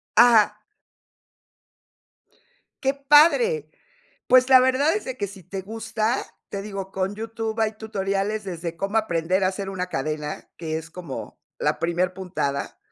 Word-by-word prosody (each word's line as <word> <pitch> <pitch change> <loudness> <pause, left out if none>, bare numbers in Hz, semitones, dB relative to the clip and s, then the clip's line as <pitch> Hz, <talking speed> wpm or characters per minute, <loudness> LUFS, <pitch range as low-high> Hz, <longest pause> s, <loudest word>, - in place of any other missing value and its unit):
Ajá. 230 -2 +6 2.2
Qué 270 +1 +2
padre. 320 - +4 0.6
Pues, 255 +1 +6
la 260 -1 +9
verdad 260 +5 +3
es 425 - -3
de 260 -1 -5
que 200 - -2
si 195 -2 -12
te 190 +2 -6
gusta, 225 +3 -1 0.3
te 200 - -4
digo, 195 -2 -6
con 195 +1 -2
YouTube 225 0 -4
hay 220 0 +1
tutoriales 205 0 -2
desde 170 -3 -5
cómo 200 +4 -1
aprender 185 -2 +1
a - - +4
hacer 195 +1 -3
una 185 -1 -3
cadena, 150 0 -4
que 160 -2 -3
es 160 +1 -8
como 170 -5 -8 0.2
la - - 0
primer 175 +2 0
puntada 180 -7 -3
200 Hz, 145 wpm, -24 LUFS, 180-225 Hz, 2.2 s, la